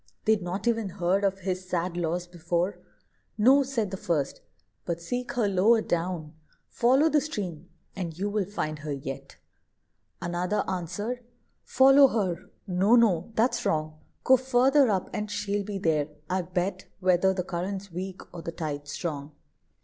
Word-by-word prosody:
They'd 220 -2 +3
not 185 +5 -4
e'en 225 -4 +1
heard 185 +2 0
of 195 -1 0
his 185 0 -3
sad 175 0 -1
loss 175 +1 -1
before. 175 +2 -2 0.6
"No," 260 +6 +6
said 245 -7 -1
the 190 - -4
first; 165 -8 -1 0.4
"but 170 -1 -3
seek 245 +10 -4
her 235 -4 +1
lower 200 +4 +4
down: 170 -5 -2 0.4
Follow 260 +6 +4
the 305 -2 +3
stream, 185 - -5 0.3
and 170 -4 -5
you 200 +3 -1
will 205 -1 0
find 155 -6 -3
her 150 0 -5
yet." 135 -1 -7 0.8
Another 175 +4 -1
answer'd: 190 +7 -3 0.4
"Follow 270 +2 +6
her! 190 -8 -2 0.2
no, 195 +4 +3
no; 215 -5 +3
that's 240 +1 +2
wrong. 155 -3 -1 0.2
Go 260 - +6
further 260 +1 +4
up, 190 -3 0
and 210 0 -3
she'll 205 0 -1
be 200 0 -4
there, 155 -5 +1 0.2
I 185 +1 0
bet, 180 +2 -3
Whether 185 0 +3
the 185 -1 -2
current's 190 +2 -4
weak, 185 +2 -5
or 170 - -7
the 165 - -5
tide 150 -3 -5
strong." 145 -1 -4
185 Hz, 155 wpm, -27 LUFS, 170-215 Hz, 0.8 s, No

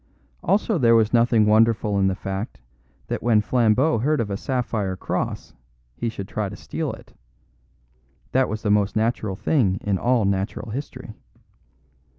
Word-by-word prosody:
Also 200 0 +1
there 115 -3 +5
was 110 0 +3
nothing 115 -2 +4
wonderful 105 -1 +3
in 95 - +3
the 95 - 0
fact 95 - -5 0.5
that - - -4
when 115 -2 +3
Flambeau 120 +5 +2
heard 150 +6 +1
of 105 -3 -2
a - - -1
sapphire 110 -5 -2
cross - - -4 0.4
he 120 - -2
should 100 -4 -7
try 105 -1 -3
to 100 - -8
steal - - -4
it; - - -13 1.2
that 130 0 +2
was 110 0 -4
the 105 - +1
most 105 -1 +2
natural 110 -3 0
thing 100 -5 +1
in 100 -2 0
all 120 -3 +2
natural 100 +3 -2
history. 125 -2 -7
110 Hz, 160 wpm, -23 LUFS, 100-120 Hz, 1.2 s, there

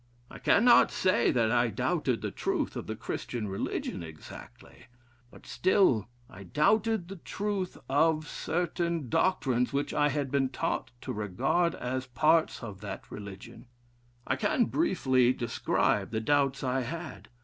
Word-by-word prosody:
I - - -10
cannot 240 +3 +5
say 190 +4 +2
that 115 -3 +2
I 120 0 +3
doubted 110 - -1
the - - -2
truth - - -2
of - - -5
the - - -3
Christian 115 -4 -4
religion 95 -2 -3
exactly, 80 -2 -12 0.4
but - - -16
still 180 - +2 0.2
I 95 - -13
doubted 195 - +1
the 195 +1 -8
truth 195 +1 -3
of 155 +2 +2
certain 170 -4 -2
doctrines 130 -7 +1
which 140 +1 -1
I 145 0 +3
had 140 -2 -2
been 135 -2 +1
taught 130 - -2
to - - -4
regard 125 - 0
as 130 +1 -3
parts 155 +4 +2
of 105 -4 -8
that 105 - -7
religion. 105 +4 -10 0.6
I - - 0
can 225 +3 +2
briefly 130 - +2
describe 120 -2 0
the 110 - -2
doubts 140 +3 +1
I 130 0 0
had. 155 +4 -6
140 Hz, 145 wpm, -29 LUFS, 120-175 Hz, 0.6 s, cannot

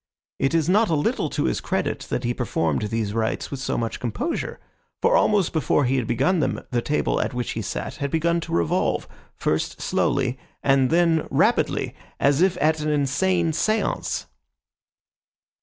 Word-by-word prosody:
It 135 +4 +1
is 160 -2 +2
not 210 +3 +3
a 160 - +2
little 145 - 0
to - - -1
his - - 0
credit - - -2
that 125 - -2
he 120 0 0
performed 85 - -1
these 110 -2 -2
rites 110 0 -1
with 140 - -4
so 135 - -2
much 115 -1 -2
composure, 245 - -3 0.4
for 480 +2 +3
almost 205 - +3
before 150 -2 +2
he 130 +2 +1
had 125 - -1
begun 135 +10 +2
them 135 -3 -1
the 120 -1 +1
table 150 +5 0
at - - -3
which 125 -1 -2
he 110 - -3
sat 130 - -4
had 140 -2 -2
begun 170 +3 +1
to - - -7
revolve, 85 -2 +1 0.3
first - - -1
slowly, 130 -2 0 0.2
and 135 -2 +4
then 165 -2 +3
rapidly, - - +1 0.3
as 140 +2 +3
if 185 -1 +3
at 155 +2 +2
an 150 0 -1
insane 160 +4 +1
seance. 215 +8 0
140 Hz, 175 wpm, -24 LUFS, 125-170 Hz, 0.4 s, and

